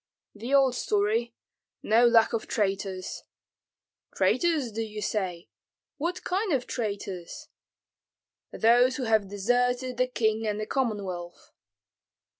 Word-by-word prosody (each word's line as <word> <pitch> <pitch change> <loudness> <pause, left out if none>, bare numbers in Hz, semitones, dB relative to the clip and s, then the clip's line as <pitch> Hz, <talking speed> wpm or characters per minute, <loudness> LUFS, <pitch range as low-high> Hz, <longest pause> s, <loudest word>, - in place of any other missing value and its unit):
"The 230 +5 -7
old 270 -2 +5
story, 225 +1 0 0.5
no 230 +3 +5
lack 230 -1 +4
of 230 - -2
traitors." 195 -2 -2 0.9
"Traitors, 315 -9 +1
do 225 +2 -3
you 215 -1 -5
say? 185 -5 -3 0.5
What 350 +5 -3
kind 385 +2 -1
of 255 -3 0
traitors?" 200 -6 -5 1.0
"Those 245 +3 +4
who 270 - -3
have 220 -4 +2
deserted 245 +5 0
the 255 0 +2
king 220 -3 0
and 210 0 -1
the 215 - -2
Commonwealth." 200 -9 -3
225 Hz, 115 wpm, -27 LUFS, 205-250 Hz, 1.0 s, old